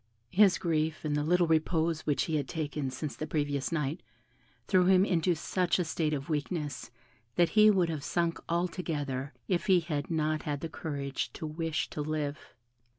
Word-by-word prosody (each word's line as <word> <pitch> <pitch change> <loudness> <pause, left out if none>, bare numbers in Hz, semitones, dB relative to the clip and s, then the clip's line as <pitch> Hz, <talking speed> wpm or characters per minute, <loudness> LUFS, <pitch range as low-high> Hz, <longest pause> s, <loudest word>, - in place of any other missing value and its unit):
His 200 -1 +5
grief, 160 -2 -1
and 150 -1 0
the 150 - +1
little 175 +3 +3
repose 160 0 +1
which 145 - +2
he 160 - -1
had 140 -3 -2
taken 150 -4 -3
since 140 +3 -5
the 155 - -5
previous 145 -2 -1
night, 150 0 -1 0.7
threw 185 -2 +4
him 190 0 +6
into 175 -2 +2
such 180 +2 0
a 180 - +1
state 160 -1 -1
of 145 -2 -3
weakness, 150 -2 -3 0.5
that 175 -1 +4
he 215 0 +6
would 185 -5 +3
have 155 -3 -3
sunk 170 +2 0
altogether 160 -6 -2 0.2
if 185 +2 0
he 185 -2 +6
had 155 -4 -3
not 155 -1 0
had 145 -1 -3
the 165 - -4
courage 140 -4 -4
to - - -6
wish 160 0 -2
to 150 - -3
live. 150 -1 -2
160 Hz, 180 wpm, -30 LUFS, 150-175 Hz, 0.7 s, him